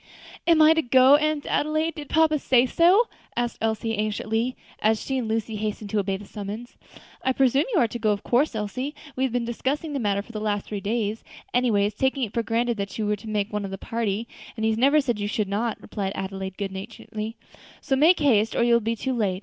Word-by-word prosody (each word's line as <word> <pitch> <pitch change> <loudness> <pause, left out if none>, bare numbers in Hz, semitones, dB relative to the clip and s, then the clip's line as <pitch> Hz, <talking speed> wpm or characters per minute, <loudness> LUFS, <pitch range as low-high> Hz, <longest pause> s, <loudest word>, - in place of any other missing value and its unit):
"Am 325 -2 +6
I 310 +1 +7
to 320 - +2
go, 260 +1 +6
Aunt 305 -1 -1
Adelaide? 310 +2 0
did 295 -3 -8
papa 315 -1 +3
say 255 -2 +4
so?" 360 - +4 0.3
asked 240 0 -1
Elsie 225 0 -1
anxiously, 215 +3 -1 0.2
as 215 0 +2
she 265 -1 -2
and 235 - -3
Lucy 220 0 -2
hastened 210 -1 -4
to 215 - +1
obey 195 -1 -1
the 205 - -11
summons. 210 +4 -7 0.5
"I 260 - +1
presume 270 +2 +3
you 385 - +3
are 240 - +4
to 240 - -5
go 220 -1 +1
of 205 -1 0
course, 250 +1 +2
Elsie; 255 +7 -3 0.2
we 260 - -1
have 260 - -2
been 240 0 -1
discussing 280 +6 -2
the 280 - -1
matter 200 -3 0
for 230 - -13
the 215 -2 -5
last 205 -1 -1
three 210 - -4
days, 215 +1 -2 0.3
always 215 -5 +2
taking 265 +4 0
it 220 -2 -3
for 235 - +1
granted 230 +1 0
that 200 -1 -4
you 215 - -1
were 210 0 +1
to 210 +2 -10
make 210 -1 -1
one 210 0 -1
of 195 - -4
the 195 - -5
party, 225 0 -2 0.3
and 220 -1 -2
he 220 - +3
has 220 - -1
never 280 +4 +5
said 240 -6 -2
you 205 - -1
should 210 -1 -1
not," 215 +3 -2
replied 200 -2 -4
Adelaide, 190 -1 -5
good 200 -2 -3
naturedly; 215 +2 -6 0.4
"so 270 - 0
make 320 +6 +5
haste, 225 -7 +3
or - - +3
you 240 0 +4
will 235 - +5
be 230 +1 -1
too 260 +4 -2
late. 200 -6 0
225 Hz, 240 wpm, -25 LUFS, 210-265 Hz, 0.5 s, I